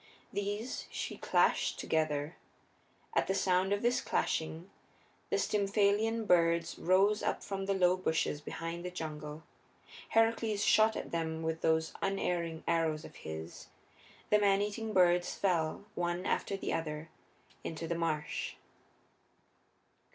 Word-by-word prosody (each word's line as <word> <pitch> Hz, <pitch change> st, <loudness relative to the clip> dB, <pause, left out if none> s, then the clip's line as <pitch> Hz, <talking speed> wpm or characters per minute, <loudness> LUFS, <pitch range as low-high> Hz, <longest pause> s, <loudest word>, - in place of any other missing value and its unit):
These 205 Hz, +4 st, -3 dB
she -, -, -4 dB
clashed -, -, +2 dB
together. 155 Hz, 0 st, -1 dB, 0.8 s
At -, -, +2 dB
the 190 Hz, -, +1 dB
sound 190 Hz, 0 st, +2 dB
of 205 Hz, +2 st, 0 dB
this 240 Hz, +1 st, +2 dB
clashing 160 Hz, +3 st, -1 dB, 0.6 s
the -, -, +1 dB
Stymphalean 210 Hz, +2 st, +2 dB
birds 170 Hz, -2 st, +3 dB
rose 195 Hz, +4 st, +3 dB
up -, -, -1 dB
from 195 Hz, -1 st, -4 dB
the 195 Hz, -, +1 dB
low 180 Hz, -1 st, +4 dB
bushes 160 Hz, -4 st, 0 dB
behind 165 Hz, +3 st, -5 dB
the 180 Hz, -, -3 dB
jungle. 155 Hz, -3 st, -6 dB, 0.7 s
Heracles 225 Hz, -2 st, +2 dB
shot 220 Hz, +1 st, +5 dB
at -, -, -5 dB
them 160 Hz, -1 st, -2 dB
with 160 Hz, 0 st, -2 dB
those 160 Hz, 0 st, +2 dB
unerring 175 Hz, -4 st, -1 dB
arrows 165 Hz, -2 st, +1 dB
of -, -, -12 dB
his. 80 Hz, +1 st, -7 dB, 0.6 s
The 210 Hz, -, +6 dB
maneating 205 Hz, +2 st, +1 dB
birds 175 Hz, -2 st, +3 dB
fell, 175 Hz, -1 st, 0 dB
one 175 Hz, +1 st, -2 dB
after 195 Hz, -, 0 dB
the -, -, -3 dB
other, 155 Hz, -1 st, -3 dB, 0.5 s
into 165 Hz, 0 st, -4 dB
the 170 Hz, -, 0 dB
marsh. 160 Hz, -3 st, -2 dB
175 Hz, 130 wpm, -33 LUFS, 160-200 Hz, 0.8 s, The